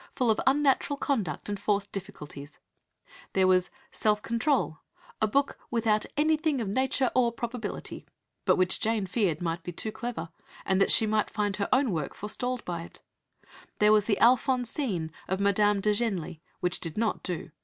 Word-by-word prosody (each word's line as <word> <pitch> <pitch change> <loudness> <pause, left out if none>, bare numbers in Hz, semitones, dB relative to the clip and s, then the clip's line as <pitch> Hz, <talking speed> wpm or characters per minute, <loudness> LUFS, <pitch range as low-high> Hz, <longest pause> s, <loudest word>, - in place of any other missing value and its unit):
full 245 -3 +3
of 215 - 0
unnatural 280 0 +3
conduct 215 - -2
and 205 -1 -3
forced 200 0 0
difficulties"; 150 -7 -8 0.8
there 190 -1 +3
was 185 -1 +3 0.2
Self 210 -1 +2
Control, 235 - 0 0.4
a 215 - +4
book 280 +6 0
"without 220 -2 +1
anything 310 -1 +2
of 225 - -2
nature 260 +4 +1
or 245 -2 +3
probability," 235 0 -5 0.4
but - - +5
which 185 0 +2
Jane 220 -2 0
feared 180 -4 0
might 165 0 -2
be 175 - -6
"too 215 +5 -3
clever," 220 -8 -5 0.4
and 190 0 +2
that - - +4
she 220 - +5
might 215 0 +1
find 205 -2 -1
her 200 - -1
own 260 -2 +3
work 155 -5 -3
forestalled 245 +4 -3
by 170 -2 -3
it; 170 - -12 0.8
there 210 0 +5
was 210 -1 +4
the 205 -3 +1
Alphonsine 245 - +2 0.2
of 190 +1 -1
Madame 200 0 +3
de 210 +1 +2
Genlis, 190 -7 -2 0.2
which 180 0 -1
"did 165 0 -5
not 225 0 0
do. 175 -4 -5
210 Hz, 170 wpm, -28 LUFS, 185-245 Hz, 0.8 s, but